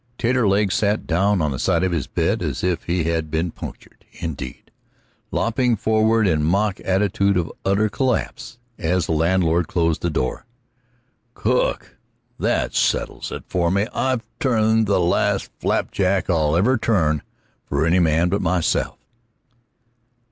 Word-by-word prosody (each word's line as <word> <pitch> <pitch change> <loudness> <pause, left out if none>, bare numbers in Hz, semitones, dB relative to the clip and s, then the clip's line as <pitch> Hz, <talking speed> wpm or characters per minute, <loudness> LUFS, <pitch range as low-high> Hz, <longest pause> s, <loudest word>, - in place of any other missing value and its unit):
Taterleg 105 -5 +2
sat 105 0 0
down 95 +1 +1
on 75 - 0
the 65 - -4
side - - +1
of 95 - +1
his 80 -6 -2
bed - - 0
as - - -3
if 90 -2 -1
he 85 0 0
had 80 -1 -1
been 80 +2 -1
punctured, - - -10
indeed, 70 -6 -7 0.6
lopping 120 +1 +1
forward 110 +1 +2
in 80 -4 +2
mock 100 +5 +1
attitude 100 0 +1
of 85 -2 -1
utter 100 +3 +2
collapse 125 +1 -2 0.2
as 90 -1 0
the - - -3
landlord 85 +1 +2
closed 85 -2 0
the 85 - 0
door. 75 - -3 0.9
"Cook! 125 +4 -1 0.4
That - - 0
settles - - -1
it - - -6
for 85 -2 0
me; 100 +3 +1
I've 130 -3 0 0.2
turned 110 -5 +2
the 100 -1 +2
last 85 0 +1
flapjack 95 -1 0
I'll 80 -2 +2
ever 120 +7 +2
turn 80 -10 +1 0.4
for 70 +3 -1
any 85 +3 +3
man 85 +1 +2
but 100 +3 0
myself." 85 0 0
95 Hz, 145 wpm, -21 LUFS, 85-110 Hz, 0.9 s, any